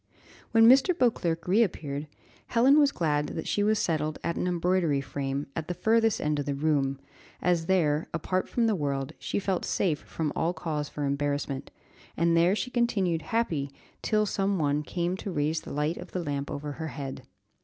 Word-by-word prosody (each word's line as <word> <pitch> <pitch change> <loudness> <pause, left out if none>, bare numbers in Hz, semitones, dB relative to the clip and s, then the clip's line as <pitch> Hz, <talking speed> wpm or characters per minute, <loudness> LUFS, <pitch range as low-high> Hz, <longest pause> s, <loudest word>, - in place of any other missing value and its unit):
When 225 0 +6
Mr. 270 +8 +6
Beauclerc 170 - +1
reappeared, 160 -8 +1 0.4
Helen 265 +6 +5
was 285 -1 +5
glad 150 - 0
that 160 - -5
she 205 - 0
was 215 +1 +3
settled 155 -4 -1
at 170 - -1
an - - -1
embroidery 175 -4 +1
frame, 135 +1 -3
at 160 -1 -4
the 180 - -3
furthest 225 +1 +2
end 150 -1 0
of 145 - -3
the 140 - -1
room, 140 -2 +1 0.4
as 170 -2 +1
there, 155 -5 +2
apart 185 +3 -1
from 235 - +1
the 225 - +3
world, 140 -4 -2
she - - -3
felt 195 -2 -1
safe 160 -6 0
from 155 -3 -4
all 170 +2 0
cause 155 -3 -3
for 145 - -3
embarrassment, 140 -1 -2 0.5
and 170 +1 +3
there 170 +4 +4
she 250 +3 -3
continued 195 -9 +1
happy 165 -12 -1 0.3
till 215 -1 +2
some 195 0 0
one 145 -2 +1
came 175 +3 -2
to 200 - -6
raise 155 0 0
the - - -9
light 150 +4 -1
of 180 - -10
the 180 - -2
lamp 140 -2 -3
over 145 +1 -4
her 160 +2 -5
head. 140 -3 -6
165 Hz, 185 wpm, -28 LUFS, 145-195 Hz, 0.5 s, When